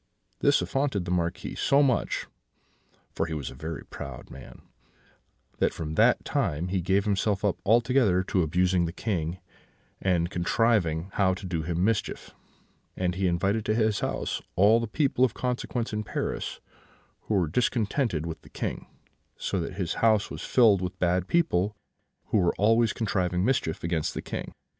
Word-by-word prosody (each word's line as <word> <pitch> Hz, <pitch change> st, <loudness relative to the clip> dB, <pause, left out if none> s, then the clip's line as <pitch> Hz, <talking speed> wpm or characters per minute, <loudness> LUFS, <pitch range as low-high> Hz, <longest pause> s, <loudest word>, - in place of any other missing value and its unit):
This 145 Hz, 0 st, +3 dB
affronted 135 Hz, -9 st, -1 dB
the 90 Hz, -, -3 dB
Marquis 85 Hz, -1 st, -1 dB
so 140 Hz, +1 st, +3 dB
much 130 Hz, -3 st, 0 dB, 0.9 s
(for -, -, -2 dB
he 80 Hz, -, -4 dB
was 70 Hz, -4 st, -4 dB
a -, -, -9 dB
very 80 Hz, 0 st, -6 dB
proud 65 Hz, -3 st, -9 dB
man) 65 Hz, -, -12 dB, 1.0 s
that -, -, +1 dB
from 80 Hz, -1 st, -4 dB
that 115 Hz, +8 st, +3 dB
time 90 Hz, -, -1 dB
he 95 Hz, 0 st, 0 dB
gave 95 Hz, +3 st, +1 dB
himself 100 Hz, 0 st, 0 dB
up 100 Hz, -, 0 dB
altogether 115 Hz, -3 st, +3 dB
to 95 Hz, 0 st, 0 dB
abusing 90 Hz, +2 st, +2 dB
the 85 Hz, -, -3 dB
King, 90 Hz, -5 st, -2 dB, 0.6 s
and 85 Hz, -2 st, +1 dB
contriving 90 Hz, -3 st, +1 dB
how 95 Hz, -2 st, +2 dB
to 95 Hz, -, -9 dB
do 85 Hz, -3 st, -2 dB
him 85 Hz, +2 st, -1 dB
mischief; 110 Hz, -1 st, -2 dB, 0.6 s
and 90 Hz, -1 st, 0 dB
he 95 Hz, +1 st, 0 dB
invited 100 Hz, +5 st, +1 dB
to 110 Hz, -, +1 dB
his 110 Hz, -2 st, +2 dB
house -, -, -2 dB
all 105 Hz, +5 st, +5 dB
the 115 Hz, -, -2 dB
people 130 Hz, +2 st, +1 dB
of 130 Hz, -, +2 dB
consequence 125 Hz, -2 st, -2 dB
in 105 Hz, -, -1 dB
Paris -, -, -3 dB, 0.7 s
who 110 Hz, -, +1 dB
were 90 Hz, -4 st, +2 dB
discontented 110 Hz, -, 0 dB
with 80 Hz, -1 st, -6 dB
the -, -, -17 dB
King: -, -, -4 dB, 0.5 s
so 95 Hz, -, -2 dB
that 85 Hz, -, -4 dB
his 90 Hz, -3 st, -2 dB
house 110 Hz, -2 st, +3 dB
was -, -, -6 dB
filled 110 Hz, -7 st, +4 dB
with 90 Hz, 0 st, -4 dB
bad 90 Hz, +1 st, +1 dB
people, 105 Hz, -, +1 dB, 0.5 s
who 105 Hz, -, +3 dB
were 90 Hz, -2 st, +2 dB
always 115 Hz, +2 st, +3 dB
contriving 90 Hz, -4 st, 0 dB
mischief 115 Hz, -11 st, 0 dB
against 85 Hz, -2 st, -1 dB
the -, -, -4 dB
King. -, -, -5 dB
95 Hz, 165 wpm, -27 LUFS, 85-115 Hz, 1.0 s, all